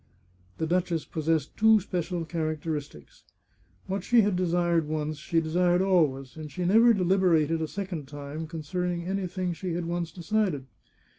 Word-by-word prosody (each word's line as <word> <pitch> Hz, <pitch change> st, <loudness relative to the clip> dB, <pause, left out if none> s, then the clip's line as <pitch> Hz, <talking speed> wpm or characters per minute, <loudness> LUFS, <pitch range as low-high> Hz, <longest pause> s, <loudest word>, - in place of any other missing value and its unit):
The 160 Hz, -, -1 dB
duchess 170 Hz, -1 st, 0 dB
possessed 160 Hz, -2 st, -1 dB
two 220 Hz, 0 st, +5 dB
special 180 Hz, -3 st, -3 dB
characteristics. 155 Hz, -, -4 dB, 0.6 s
What 190 Hz, 0 st, -3 dB
she 240 Hz, -1 st, +5 dB
had 205 Hz, -2 st, +1 dB
desired 175 Hz, -2 st, +1 dB
once 155 Hz, -1 st, -3 dB
she 165 Hz, +2 st, +1 dB
desired 175 Hz, +3 st, +2 dB
always, 145 Hz, -9 st, +1 dB
and 155 Hz, -2 st, -8 dB
she 175 Hz, +5 st, -3 dB
never 225 Hz, +6 st, +6 dB
de 200 Hz, -5 st, +2 dB
liberated 170 Hz, -4 st, +3 dB
a 160 Hz, -, -1 dB
second 180 Hz, -6 st, -5 dB
time 145 Hz, +3 st, -6 dB
concerning 170 Hz, +2 st, -3 dB
anything 185 Hz, -1 st, -2 dB
she 180 Hz, +1 st, -4 dB
had 170 Hz, 0 st, -2 dB
once 170 Hz, 0 st, -2 dB
decided. 185 Hz, -6 st, -1 dB
170 Hz, 150 wpm, -27 LUFS, 155-185 Hz, 0.6 s, never